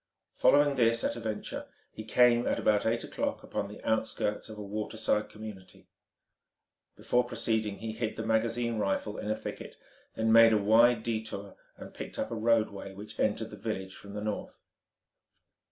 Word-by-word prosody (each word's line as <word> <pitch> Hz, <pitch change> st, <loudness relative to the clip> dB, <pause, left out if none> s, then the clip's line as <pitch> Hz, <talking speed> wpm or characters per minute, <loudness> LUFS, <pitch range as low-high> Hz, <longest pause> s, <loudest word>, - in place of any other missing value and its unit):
Following 145 Hz, -1 st, +4 dB
this 115 Hz, -1 st, +3 dB
at -, -, 0 dB
a -, -, -6 dB
venture, 110 Hz, -2 st, -4 dB, 0.2 s
he 110 Hz, -, -8 dB
came, 120 Hz, +2 st, +4 dB
at -, -, +1 dB
about 105 Hz, 0 st, +2 dB
eight 115 Hz, +1 st, 0 dB
o'clock, -, -, -3 dB
upon 100 Hz, -, -3 dB
the 105 Hz, -, -10 dB
outskirts 110 Hz, -1 st, -1 dB
of 110 Hz, -, -9 dB
a 105 Hz, -, -6 dB
waterside 105 Hz, +1 st, -1 dB
community. 105 Hz, -4 st, -10 dB, 1.1 s
Before 125 Hz, 0 st, +1 dB
proceeding 110 Hz, -4 st, -1 dB
he 110 Hz, +2 st, -5 dB
hid 110 Hz, 0 st, -3 dB
the 110 Hz, -, -4 dB
magazine 115 Hz, +1 st, 0 dB
rifle 105 Hz, +1 st, -1 dB
in 105 Hz, -, -4 dB
a 110 Hz, -, +1 dB
thicket, -, -, -7 dB, 0.4 s
then 110 Hz, 0 st, +1 dB
made 115 Hz, 0 st, +8 dB
a -, -, +5 dB
wide 110 Hz, +3 st, +5 dB
detour, 110 Hz, -3 st, -4 dB, 0.2 s
and -, -, -10 dB
picked -, -, -8 dB
up -, -, -2 dB
a -, -, -2 dB
roadway 110 Hz, -4 st, 0 dB
which 105 Hz, +2 st, -10 dB
entered 110 Hz, +1 st, 0 dB
the -, -, -7 dB
village 95 Hz, -2 st, -4 dB
from 100 Hz, 0 st, -10 dB
the 105 Hz, -, -3 dB
north. 105 Hz, -1 st, -4 dB
110 Hz, 170 wpm, -30 LUFS, 105-115 Hz, 1.1 s, made